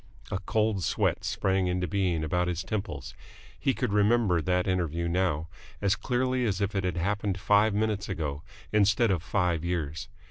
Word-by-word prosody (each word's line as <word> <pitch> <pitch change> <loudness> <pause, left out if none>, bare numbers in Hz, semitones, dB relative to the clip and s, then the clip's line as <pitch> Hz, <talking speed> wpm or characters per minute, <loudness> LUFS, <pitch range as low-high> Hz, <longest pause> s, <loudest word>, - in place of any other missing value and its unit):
A 95 - -1
cold 105 -1 0
sweat - - 0
sprang 95 -1 0
into 90 0 0
being 90 -3 0
about 90 +3 0
his 90 0 -2
temples. 95 - -4 0.5
He - - +1
could - - -1
remember 105 -4 +3
that 90 +1 +1
interview 85 -3 -1
now, 85 -3 0 0.3
as 100 0 +2
clearly 130 0 0
as 100 -5 0
if 100 0 -1
it 95 -1 0
had 90 -1 -1
happened 100 +2 -1
five 105 +1 +3
minutes 105 -2 0
ago 75 -6 -3 0.3
instead 105 +1 +3
of 90 -5 0
five 85 -2 0
years. 80 -5 -3
95 Hz, 170 wpm, -28 LUFS, 85-105 Hz, 0.5 s, remember